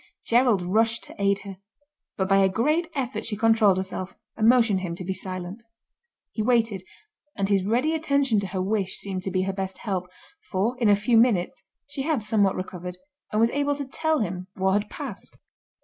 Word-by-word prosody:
Gerald 235 -5 +3
rushed 225 +5 +1
to - - -10
aid 200 0 +2
her, 195 -2 -8 0.6
but 190 - 0
by 195 0 +4
a 195 -1 +4
great 305 - +1
effort 245 -5 -2
she 210 -2 -3
controlled 220 -3 +4
herself 190 0 -4 0.2
and 220 0 +4
motioned 230 -6 +4
him 170 -2 -4
to 180 - -7
be 190 - -1
silent. 185 +2 -6 0.7
He 220 - -3
waited, 225 -4 +2 0.5
and 195 - 0
his 195 -2 +2
ready 245 +10 +1
attention 280 -7 +2
to 200 - -3
her 185 0 -2
wish 195 -1 -1
seemed 190 -2 -4
to 190 - -3
be 185 0 0
her 195 0 -2
best 190 0 -4
help, 185 -4 -3 0.4
for, 210 +6 0
in 230 -4 +3
a 205 - +7
few 215 +3 +2
minutes, 220 -6 +2 0.3
she 285 -1 -5
had 285 -5 0
somewhat 210 -2 +2
recovered, 180 -1 -6 0.3
and 215 - +1
was 230 +1 +4
able 285 +1 0
to 280 0 -4
tell 315 +2 0
him 185 -2 -3
what 190 0 +1
had 205 +2 0
passed. - - -7
205 Hz, 195 wpm, -25 LUFS, 190-235 Hz, 0.7 s, a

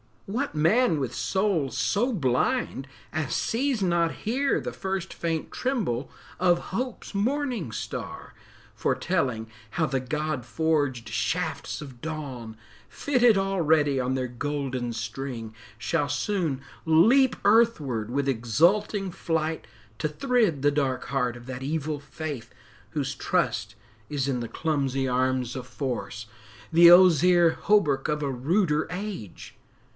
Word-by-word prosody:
What 240 - -3
man 165 +5 +3
with 135 -4 -2
soul 190 -8 0
so 240 +5 +1
blind 135 - 0 0.2
as 155 -3 -2
sees 250 -2 0
not 170 -2 +2
here 265 +6 +1
The - - -4
first 190 -1 -4
faint 165 -2 -3
tremble 190 - -1 0.3
of 175 -1 +2
Hope's 250 +2 -4
morning 235 - -1
star, - - -6 0.4
Foretelling 130 -11 -1 0.2
how 165 - +1
the 135 -3 0
God 150 0 -3
forged 145 -5 0
shafts 105 +6 -2
of 130 -5 -10
dawn, 135 -8 -6 0.3
Fitted 245 -6 +3
already 160 -8 +2
on 130 +1 0
their 130 -1 -2
golden 130 -2 -3
string, 115 0 -5 0.2
Shall 145 +6 0
soon 150 -2 -1 0.2
leap 230 +12 +5
earthward 160 - +3
with 140 +2 0
exulting 175 - +2
flight 160 -2 -2 0.3
To - - +1
thrid 210 - +1
the 145 +1 +4
dark 140 -3 -1
heart 125 -2 0
of 120 0 -11
that 130 -1 -6
evil 150 +1 -2
faith 145 -4 -7 0.4
Whose - - -2
trust - - -1 0.3
is 140 -2 -1
in 125 -2 0
the 120 - -4
clumsy 135 -2 -1
arms 130 0 0
of 125 -1 -7
Force, 125 -6 -4 0.5
The 170 +1 +8
ozier 175 -1 +7
hauberk 150 -11 +3
of 150 0 -1
a 140 - -1
ruder 150 +4 +1
age? 180 - -6
150 Hz, 130 wpm, -26 LUFS, 130-190 Hz, 0.5 s, The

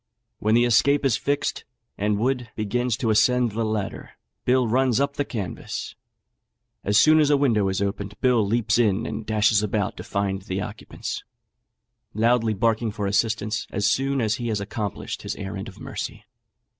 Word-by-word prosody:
When 110 +1 +2
the 120 +1 +5
escape 140 +5 +3
is 130 -5 +3
fixed, 140 +5 -1 0.3
and 105 +1 0
Wood 125 +2 -1
begins 115 +2 -1
to 115 -4 0
ascend 125 +2 +3
the 115 +2 -2
ladder, 110 -3 -3 0.3
Bill 125 -1 +3
runs 125 +1 +2
up 140 0 +1
the 145 - -1
canvas; 100 - -5 0.9
as 100 +1 +2
soon 155 +6 +6
as 150 -2 +4
a 145 - +5
window 115 -8 +2
is 95 +1 -1
opened, 100 0 -4
Bill 125 -4 +3
leaps 110 +2 +1
in 110 -2 +2
and 110 - -5
dashes 105 -1 +3
about 105 -1 -1
to - - -6
find 100 -1 -2
the 95 0 -4
occupants, - - -6 0.9
loudly 115 0 +2
barking 115 +2 +1
for 105 -1 -4
assistance 105 +1 0
as 100 +1 +1
soon 135 0 0
as 110 -1 +1
he 120 - -4
has 110 -3 0
accomplished 100 0 -4
his - - -4
errand 100 +1 -6
of 95 - -11
mercy. - - -6
110 Hz, 170 wpm, -24 LUFS, 105-125 Hz, 0.9 s, soon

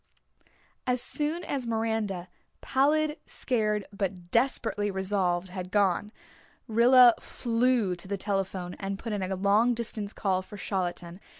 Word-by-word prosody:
As 250 0 +2
soon 305 +7 -2
as 265 -6 -3
Miranda, 220 -5 -1 0.3
pallid, 300 +3 +2
scared, 215 -5 -1
but 185 -3 -4
desperately 230 -4 +1
resolved, 190 -2 0
had 180 0 -6
gone, 205 +1 +1 0.6
Rilla 240 +2 +7
flew 235 -4 0
to 175 - -5
the 200 +1 -2
telephone 190 -2 -2
and 195 0 -3
put 225 +1 -5
in 205 - -2
a 190 +1 -2
long 205 +6 +3
distance 220 -3 -3
call 190 -3 0
for 205 +2 -11
Charlottetown. 180 -2 -3
205 Hz, 130 wpm, -28 LUFS, 190-235 Hz, 0.6 s, Rilla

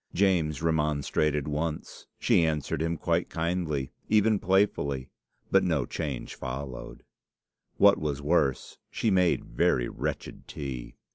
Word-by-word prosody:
James 85 -6 +2
remonstrated 75 -2 +1
once. 75 +1 -4
She 85 - +3
answered 75 -2 -1
him 85 +1 -1
quite 85 +1 0
kindly, 80 -5 -2 0.2
even 110 -1 +4
playfully, 80 -9 +1 0.4
but 95 0 +5
no 80 -8 +1
change 75 -6 -4
followed. 65 0 -6 0.7
What - - +6
was 75 -2 -2
worse, 75 -3 0
she 110 - 0
made 90 -2 +2
very - - +1
wretched - - -5
tea. 65 -5 -6
75 Hz, 120 wpm, -28 LUFS, 70-85 Hz, 0.7 s, What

